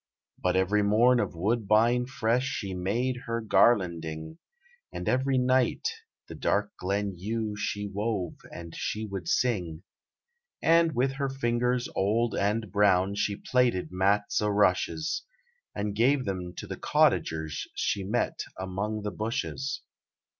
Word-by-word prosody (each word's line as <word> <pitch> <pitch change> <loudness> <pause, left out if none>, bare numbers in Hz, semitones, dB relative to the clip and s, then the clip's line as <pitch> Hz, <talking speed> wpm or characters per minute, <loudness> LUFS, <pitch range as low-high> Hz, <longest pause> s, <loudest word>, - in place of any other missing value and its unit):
But 90 0 +1
every 95 +3 +2
morn 115 +5 +4
of 105 - -2
woodbine 115 +5 +2
fresh 125 0 0
She 100 -7 -3
made 115 +8 -1
her 115 0 -1
garlanding, 85 -8 +1 0.5
And - - -6
every 130 +1 +2
night 130 0 +2 0.4
the - - -8
dark - - -1
glen 100 +1 -1
Yew 105 +3 -3
She 105 0 -3
wove, 100 -3 -2
and 85 -1 -9
she 110 +1 -3
would 95 -4 -6
sing. 90 -9 0 0.8
And 165 -1 +4
with 130 +2 +2
her 140 -1 -1
fingers 125 -1 0
old 110 +4 +1
and 105 0 0
brown 100 -1 +3
She 100 0 0
plaited 120 -4 +1
Mats 100 +3 +1
o' 105 - +1
Rushes, 105 - +1 0.5
And 100 0 -2
gave 130 +4 +3
them 90 -3 -4
to - - -6
the - - -6
Cottagers 80 -1 +1
She 100 - -1
met 110 +6 -1 0.2
among 100 +3 -3
the 105 - -2
Bushes. 125 +5 -3
105 Hz, 135 wpm, -28 LUFS, 95-120 Hz, 0.8 s, morn